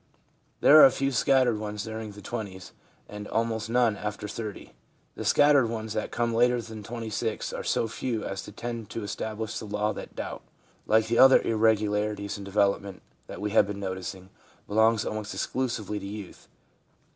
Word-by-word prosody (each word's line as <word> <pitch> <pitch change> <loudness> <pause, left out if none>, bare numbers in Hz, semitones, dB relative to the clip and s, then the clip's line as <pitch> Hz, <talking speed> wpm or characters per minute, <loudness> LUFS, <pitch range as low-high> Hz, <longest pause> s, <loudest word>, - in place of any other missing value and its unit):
There 155 - +8
are - - +11
a - - +8
few 135 +1 -1
scattered 130 -3 +3
ones 105 -1 -4
during 110 -1 -6
the 105 - -12
twenties, 100 -6 -6 0.4
and 105 0 -8
almost 115 -1 -1
none 120 -2 +3
after 105 0 -5
30. 105 -1 -7 0.4
The - - -6
scattered 145 -4 +5
ones 110 -1 -4
that 110 - -2
come 120 -1 -1
later 120 +1 +3
than 110 -2 -8
26 110 0 -4
are - - -4
so 115 - 0
few 115 0 -3
as 95 0 -4
to - - -10
tend 115 0 -6
to 115 - -5
establish 110 +1 -4
the - - -7
law 105 +1 -1
that - - -9
doubt, - - -5 0.5
like 110 0 +4
the 115 +1 0
other 130 0 +8
irregularities 105 -2 +1
in 100 - -7
development 100 -1 0 0.2
that - - -8
we 105 0 -2
have 110 - +4
been 100 -1 -5
noticing, 95 -1 -6 0.4
belongs 110 +1 +3
almost 110 0 -4
exclusively 110 -5 -2
to 100 - -7
youth. 100 -2 -9
110 Hz, 175 wpm, -27 LUFS, 105-115 Hz, 0.5 s, are